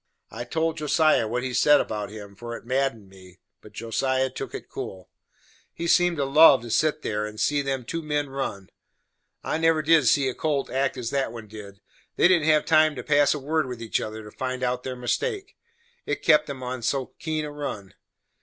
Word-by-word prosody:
I 120 - -6
told 160 +5 -1
Josiah 150 -5 +3
what 125 +3 -2
he 130 -1 -3
said 145 +4 +5
about 105 -2 -3
him, 100 -2 -10
for 120 +3 -7
it - - -16
madded 130 -4 -1
me, 95 -1 -16 0.2
but 105 - -14
Josiah 130 +4 -1
took - - -6
it - - -8
cool. 95 -1 -8 0.6
He 170 - -4
seemed 175 0 +3
to 140 - 0
love 135 -3 +7
to 120 - -7
set 155 +5 +1
there 105 0 -2
and 105 0 -10
see 145 +3 +1
them 135 -3 -3
two 165 +6 -4
men 150 -2 -1
run. 115 -8 -5 0.7
I 155 - -2
never 165 -1 +2
did 155 -4 +4
see 135 +3 +4
a 130 - -1
colt 145 -2 -2
act 135 +1 0
as 120 -1 -4
that 135 -4 -1
one 115 -2 -9
did; 100 -2 -11 0.3
they - - +5
didn't 175 -4 +3
have 155 -1 +4
time 155 -1 +4
to 125 - -6
pass 145 +1 +3
a - - -4
word 155 +1 -1
with 125 -2 -6
each 115 -1 -2
other, 110 0 -6
to 105 - -11
find 130 +1 -4
out 125 0 0
their 130 0 -5
mistake, 390 - -3 0.5
it - - -2
kep' 150 -2 +4
'em 130 -2 -5
so 135 +4 0
on - - -7
a - - -28
keen 155 -1 -2
run. 140 -10 -6
130 Hz, 210 wpm, -25 LUFS, 115-150 Hz, 0.7 s, love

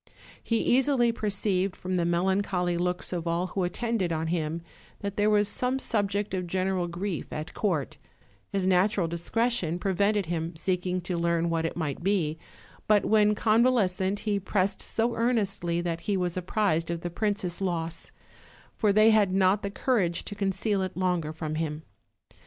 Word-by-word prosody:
He 230 - 0
easily 250 0 +3
perceived, 200 -3 -1
from 185 0 -3
the 175 -1 +1
melancholy 180 0 +1
looks 180 +1 -1
of 170 -1 -3
all 170 +2 0
who 190 - 0
attended 200 0 -1
on 160 0 -1
him, 165 -1 -2 0.4
that 200 -1 -4
there 210 +1 +2
was 210 -1 +3
some 250 +5 0
subject 205 -5 -1
of 180 -2 -2
general 185 0 0
grief 175 0 -4
at 155 +1 -5
court; 175 -10 -1 0.5
his 195 -2 -1
natural 190 0 +3
discretion 175 +1 0
prevented 200 +2 +1
his 165 0 -3
seeking 180 0 0
to 180 +1 -3
learn 170 0 +1
what 165 -1 0
it - - -7
might 155 -4 -3
be, 170 -5 0 0.5
but 210 -1 +4
when 210 -1 +4
convalescent 210 -4 +2
he 205 -2 0
pressed 195 0 0
so 230 +1 0
ear 235 +2 +2
nestly 175 -6 -1
that 170 -1 -2
he 200 -2 0
was 180 -2 -1
apprised 180 -2 0
of 170 -1 -3
the 175 - -4
princess' 200 -2 -1
loss, 165 -3 -3 0.6
for 210 -3 +2
they 215 +2 +6
had 210 -3 +4
not 190 +2 +3
the 200 - -3
courage 200 -6 0
to - - -6
conceal 195 0 0
it 185 -1 -4
longer 180 -4 0
from 155 -1 -5
him. 155 -1 -3
185 Hz, 170 wpm, -27 LUFS, 170-205 Hz, 0.6 s, they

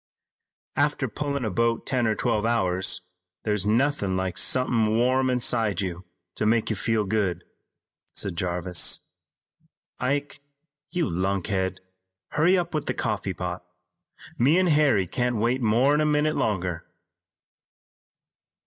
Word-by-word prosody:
"After 145 -2 +1
pullin' 140 +2 -3
a 110 - -1
boat 115 +4 0
ten 125 -4 0
or 110 - +1
twelve 105 0 0
hours 95 -7 +1 0.4
there's 105 -2 -1
nothin' 115 -4 +1
like 95 -1 -2
somethin' 115 -4 +2
warm 130 +2 +2
inside 120 -4 +1
you 95 -2 -4 0.3
to 105 - -1
make 110 0 +2
you - - 0
feel 115 -2 0
good," 100 -3 -1 0.7
said 95 -3 -3
Jarvis. 90 0 +1 1.0
"Ike, 140 +3 -2 0.5
you 170 -3 -1
lunkhead, 95 +1 -1 0.5
hurry 175 +5 +3
up 175 -1 -2
with 150 -2 -2
that - - -1
coffee 105 -4 -2
pot. 90 0 -5 0.8
Me 140 +8 +4
an' 185 - +3
Harry 145 - +3
can't 120 +7 -1
wait 120 +4 0
more'n 125 +7 +3
a - - +2
minute 150 +1 +2
longer." 90 -5 -2
115 Hz, 130 wpm, -25 LUFS, 95-135 Hz, 1.0 s, Me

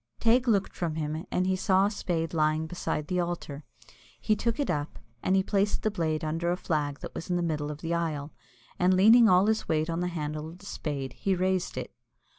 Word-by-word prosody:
Teig 240 +2 +3
looked 200 -4 +2
from 165 -3 -2
him, 155 +3 -3
and 180 - 0
he 190 0 +2
saw 190 0 +3
a 205 - 0
spade 165 -5 -2
lying 155 0 +1
beside 160 -2 -3
the 180 -1 0
altar. 170 -4 -4 0.6
He 215 - +2
took 230 +4 -1
it 285 - +1
up, 145 +1 -3 0.2
and 185 - +2
he 190 - +3
placed 200 +1 0
the 215 - +1
blade 160 -5 -1
under 165 +2 -1
a 180 - 0
flag 145 -5 -2
that - - -7
was 165 - -7
in 180 - +1
the 175 - 0
middle 150 -3 -1
of 150 0 -7
the 165 0 -2
aisle, 155 -3 -2 0.5
and 185 +1 +4
leaning 220 +4 +7
all 185 +2 +5
his 220 +1 0
weight 160 +1 +1
on 165 - -2
the 180 - 0
handle 155 -2 -4
of 170 - -12
the 195 - -16
spade, 140 -8 -4
he 195 -1 0
raised 185 0 0
it. - - -5
175 Hz, 230 wpm, -28 LUFS, 155-190 Hz, 0.6 s, leaning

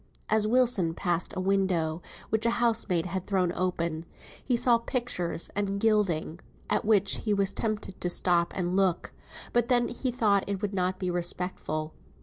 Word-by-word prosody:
As 215 0 +3
Wilson 225 -9 +3
passed 175 -1 -1
a - - 0
window 185 -4 0 0.3
which 220 0 +1
a 235 +1 +1
housemaid 225 -8 +1
had 185 0 -4
thrown 185 -3 +1
open, 170 -3 -2 0.4
he 245 -2 +1
saw 240 -1 +4
pictures 230 -9 -2
and 200 -1 -1
gilding, 195 -7 +1 0.3
at - - +1
which 205 -3 +3
he 210 -2 0
was 200 0 +2
tempted 215 -3 -3
to 175 - 0
stop 175 -1 +2
and 180 -1 -1
look; 190 -3 +1 0.4
but 240 -1 +2
then 240 -1 +2
he 255 +2 -3
thought 210 -5 +1
it 200 -1 -2
would 205 0 -3
not 185 -1 0
be 185 -1 -2
respectful. 175 -3 -2
195 Hz, 165 wpm, -28 LUFS, 175-220 Hz, 0.4 s, saw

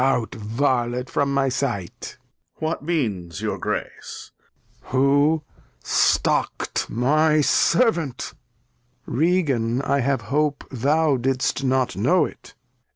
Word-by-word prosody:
Out, 130 -4 +1
Varlet, 120 +2 -1
from 140 -1 0
my 140 -1 +1
Sight. 125 -9 -4 0.4
Duke. - - -31
What 160 +1 -1
means 105 - -2
your - - -3
Grace? - - -5 0.5
Lear. - - -16
Who 145 +4 +3 0.4
stockt - - +1
my 150 +6 +2
Servant? 170 - +1 0.7
Regan, 135 -6 +1
I 140 - +1
have 135 +1 0
hope 145 +1 -1
Thou 145 +3 +2
didst 130 +1 -1
not 130 -5 +1
know 145 - +3
it. - - -12
135 Hz, 110 wpm, -23 LUFS, 120-150 Hz, 0.7 s, Who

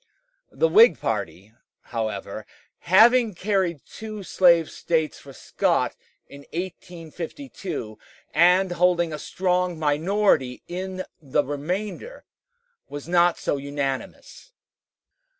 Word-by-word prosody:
The 485 - +2
Whig 465 +1 +6
party, 100 +4 -4 0.3
however, 110 -2 -5 0.3
having 225 +4 +5
carried 185 -5 -1
two 215 -2 -8
slave 170 -3 +4
States 160 -2 -1
for 140 - -13
Scott 130 - -1 0.3
in 140 - -13
1852, 175 - -7 0.3
and 180 +3 +4
holding 175 -2 +2
a 150 - -5
strong 180 -1 -1
minority 155 -3 +1
in 185 +1 -5 0.2
the 145 0 0
remainder, 185 - -5 0.6
was 145 +1 -7
not 175 0 +3
so - - -1
unanimous. 140 - -5
175 Hz, 95 wpm, -24 LUFS, 145-190 Hz, 0.6 s, Whig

